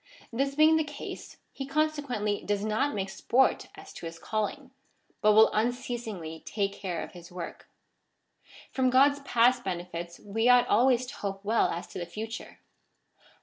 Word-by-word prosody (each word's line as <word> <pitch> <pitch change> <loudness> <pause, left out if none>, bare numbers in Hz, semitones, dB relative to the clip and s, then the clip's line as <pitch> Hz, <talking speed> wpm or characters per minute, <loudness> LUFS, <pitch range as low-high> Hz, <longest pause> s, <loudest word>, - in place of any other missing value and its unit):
This 275 +3 0
being 310 +1 +6
the 315 - +2
case, 295 -1 -8
he 270 - -6
consequently 275 -8 -1
does 205 0 -1
not 215 +6 0
make 195 -1 -3
sport 260 +6 +2
as - - -12
to 165 - -7
his 165 0 -8
calling, 220 - -3 0.5
but 215 0 +5
will 220 +1 +7
unceasingly 220 -8 -3
take 200 -2 -2
care 180 -4 -4
of - - -9
his 175 -1 -12
work.^ 175 -1 -8 1.0
From 260 -1 +2
God's 280 +3 +5
past 245 -2 +3
benefits 175 -2 -5
we 225 +4 0
ought 245 0 +7
always 250 +3 +4
to 255 - -8
hope 195 0 -5
well 225 +2 +3
as 170 +2 -4
to - - -7
the 175 - -5
future. 220 +3 -7
225 Hz, 160 wpm, -28 LUFS, 195-260 Hz, 1.0 s, will